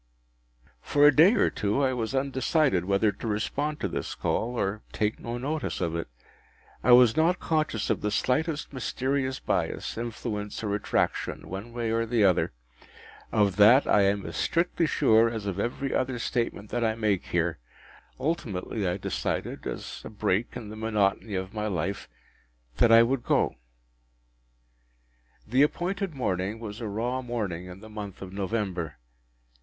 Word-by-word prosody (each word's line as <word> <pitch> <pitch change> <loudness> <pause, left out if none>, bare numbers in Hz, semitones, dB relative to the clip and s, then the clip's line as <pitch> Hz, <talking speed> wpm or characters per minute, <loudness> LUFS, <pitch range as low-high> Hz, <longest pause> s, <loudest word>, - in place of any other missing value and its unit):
For 145 0 +3
a 150 -2 +7
day 180 +10 +7
or - - +3
two 105 +7 0
I 130 -1 +2
was 120 +1 -2
undecided 135 - +1
whether 100 +2 +2
to 115 - -7
respond 145 +8 -1
to - - 0
this - - -4
call, 120 +2 -1
or 100 +2 -1
take 105 0 -1
no 120 +1 -4
notice 145 +3 -3
of 85 -2 -1
it. 85 - -3 0.8
I 125 - +4
was 120 -2 +7
not 170 +3 +3
conscious 155 -9 0
of - - -1
the 105 - 0
slightest 150 +8 0
mysterious 130 +1 -1
bias, - - -2
influence, 110 -3 -4
or 105 -2 -1
attraction, 105 - -1
one 100 +6 -6
way 115 -1 -2
or 115 0 +1 0.3
other. 90 - +2 0.8
Of 100 -2 +2
that 115 +7 +7
I 105 - +4
am 100 0 +1
as 85 - -6
strictly 170 -1 +1
sure 115 -6 +4
as 110 -3 -5
of 100 -1 -3
every 125 +5 -2
other 130 -1 0
statement 115 -3 -2
that 120 - 0
I 110 -1 +1
make 105 -4 0
here. 85 -3 0 0.6
Ultimately 110 - -2
I 90 +1 0
decided, - - -3
as - - -6
a - - -7
break 105 +2 -1
in 110 -4 -8
the 110 - -8
monotony 105 -1 0
of 95 +2 -4
my 105 -1 -2
life, 95 0 -3 0.7
that 115 - +5
I 115 0 +9
would 125 +2 0
go. - - +2 1.9
The 125 +5 +2
appointed 180 +3 0
morning 100 -3 -2
was 110 0 -7
a 115 - -3
raw 120 +5 -2
morning 105 -8 -3
in 90 +2 -10
the 110 - -11
month 105 -3 -7
of 95 0 -9
November. 95 - -2
110 Hz, 160 wpm, -27 LUFS, 100-130 Hz, 1.9 s, I